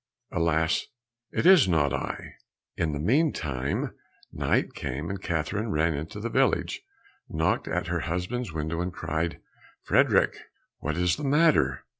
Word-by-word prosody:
Alas, 80 0 +1 0.4
it - - -1
is 185 - +8
not 75 -7 +2
I." - - -4 0.4
In 80 - 0
the 75 - -3
meantime 80 - 0 0.4
night - - 0
came, 75 +8 -4
and 95 -1 -5
Catherine 95 +7 -2
ran 80 -2 +2
into 80 +7 -5
the 115 - -3
village, - - +1 0.5
knocked 80 +1 0
at 90 +2 -1
her 85 0 -1
husband's 90 +7 -3
window, 80 +2 -2
and 90 +1 -2
cried, 80 -1 -2 0.4
"Frederick." - - +3 0.4
"What 75 +2 -3
is 90 -1 +2
the - - -6
matter?" 150 +3 +3
85 Hz, 140 wpm, -27 LUFS, 80-100 Hz, 0.5 s, is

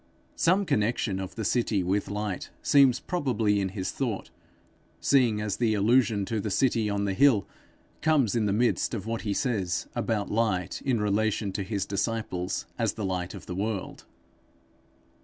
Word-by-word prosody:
Some 190 +4 +3
connection 105 - 0
of 95 -1 -6
the 110 - -3
city 110 -5 +1
with 95 +3 0
light 105 -2 -3
seems 135 -4 +5
probably 115 - 0
in 95 - -1
his 95 -1 -4
thought, 120 -7 -3 0.7
seeing 125 -6 +3
the 105 +2 0
allusion 110 -1 +3
to 110 +2 -2
the 105 - -3
city 115 0 +1
on 100 0 -1
the 100 - 0
hill 125 -3 +4 0.5
comes 145 -9 +2
in 110 -3 +1
the - - +1
midst 120 +3 +1
of 100 -3 -5
what 115 0 -3
he 105 -2 -1
says 95 -9 -1
about 105 -3 -1
light 105 -5 0
in 125 -4 +1
relation 105 0 0
to 100 - -3
his 100 0 -2
disciples 100 -3 -2
as - - +1
the 105 - -4
light 90 -1 -3
of - - -10
the 90 - -5
world. 100 +1 -4
105 Hz, 165 wpm, -27 LUFS, 100-115 Hz, 0.7 s, seems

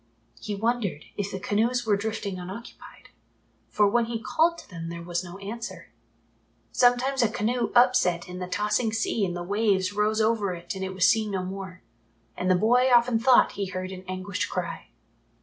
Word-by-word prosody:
He 210 -2 -4
wondered 215 -7 -1
if 200 -1 -3
the 190 - -5
canoes 230 +5 0
were 210 -2 +3
drifting 200 -2 -3
unoccupied, 190 +6 -10 0.6
for 210 -1 +3
when 235 +3 +2
he 230 0 -4
called 330 +8 +1
to - - -12
them 165 -3 -7
there 170 0 -7
was 175 +1 -2
no 175 +1 -9
answer. 225 +4 -7 0.8
Sometimes 250 +2 +3
a 235 - +3
canoe 235 +3 -1
upset 240 -8 +4
in 180 0 -7
the 180 - -4
tossing 210 +4 0
sea 225 -1 0
and 175 -2 -1
the 175 - -4
waves 200 -1 +1
rose 210 +1 +1
over 215 -4 +1
it 170 0 -6
and 190 -1 -5
it 190 0 -4
was 185 0 +4
seen 220 -1 +2
no 190 -2 -2
more, 190 -3 -7 0.5
and 180 - -2
the 185 - +5
boy 245 +7 +3
often 240 -1 +4
thought 250 +2 +5
he 200 -1 -3
heard 185 0 -5
an 185 -1 -8
anguished 185 +1 -3
cry. - - -4
205 Hz, 185 wpm, -26 LUFS, 185-230 Hz, 0.8 s, the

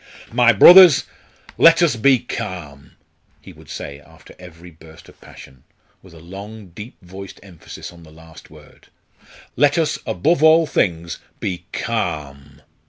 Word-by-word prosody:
"My 120 0 +3
brothers, 175 - +7 0.6
let 165 +1 +5
us 160 -7 +1
be 130 +4 +3
calm!" 90 - -9 0.5
he - - -15
would - - -19
say 70 0 -9
after 75 - -19
every 90 -1 -15
burst 80 0 -18
of - - -22
passion, 65 -1 -16 0.4
with 90 -3 -18
a - - -15
long 100 +4 -12
deep 105 +8 -12
voiced 95 +2 -12
emphasis 90 -2 -12
on 85 - -17
the 80 - -17
last 80 0 -17
word; - - -20 0.7
"let 145 +1 +1
us, 160 -2 -1
above 160 +1 -1
all 160 +1 +4
things, 85 - -3 0.2
be 90 -2 -6
calm!" 70 -1 -6
90 Hz, 145 wpm, -18 LUFS, 80-125 Hz, 0.7 s, brothers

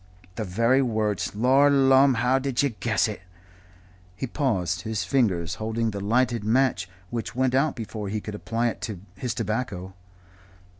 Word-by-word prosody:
"The 110 - -4
very 115 +7 +2
words. 110 -5 -1
Lor 130 +6 +4
lumme! 135 -1 +5
how 125 +3 +2
did 135 0 0
you 140 - +2
guess 115 -1 0
it?" 105 -3 -6 0.9
He 115 - -3
paused, 95 - -1
his 110 +2 -2
fingers 95 -11 +1
holding 110 +1 -1
the 100 - -5
lighted 115 +2 +1
match, 110 -6 +1 0.2
which 115 0 -4
went 130 0 +1
out 140 +3 +2
before 110 -3 -5
he 105 +2 -2
could 105 0 -7
apply 115 +3 -1
it - - -7
to 105 -5 -5 0.2
his 115 +2 -3
tobacco. 105 -4 -3
115 Hz, 160 wpm, -25 LUFS, 105-130 Hz, 0.9 s, lumme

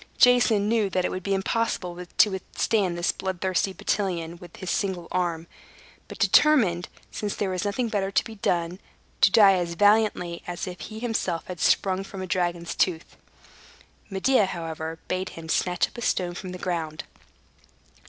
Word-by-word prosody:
Jason 245 -5 +5
knew 220 -2 +2
that 185 0 0
it - - -1
would 185 - -4
be 195 +1 0
impossible 190 -3 -2
to 210 - +6
withstand 190 -1 -1
this 175 - +1
blood 190 -2 -4
thirsty 190 +1 0
battalion 175 -3 -2
with 175 -1 -13
his 185 - -4
single 185 -4 -2
arm, 170 -3 -1 0.6
but - - -9
determined, 210 - +4 0.2
since 210 -1 -3
there 195 -2 -1
was 185 +1 -2
nothing 230 +4 -1
better 200 -3 -1
to 195 - +2
be 225 - -9
done, 175 -3 -1 0.4
to - - +7
die 200 -1 +7
as 175 -2 -1
valiantly 205 -4 +2
as 175 -1 -4
if 180 -1 -7
he 215 - -8
himself 220 -7 -2
had 180 -2 -7
sprung 190 +4 +2
from 195 0 -9
a - - -3
dragon's 175 -1 -1
tooth. 170 -3 -1 0.9
Medea, 205 +2 +2
however, 160 -2 -5
bade 185 +1 -2
him 165 -1 -10
snatch 180 +2 +1
up - - -22
a - - -6
stone 180 -6 0
from 185 +1 -7
the 180 - -6
ground. 165 -4 -3
185 Hz, 175 wpm, -25 LUFS, 175-205 Hz, 0.9 s, to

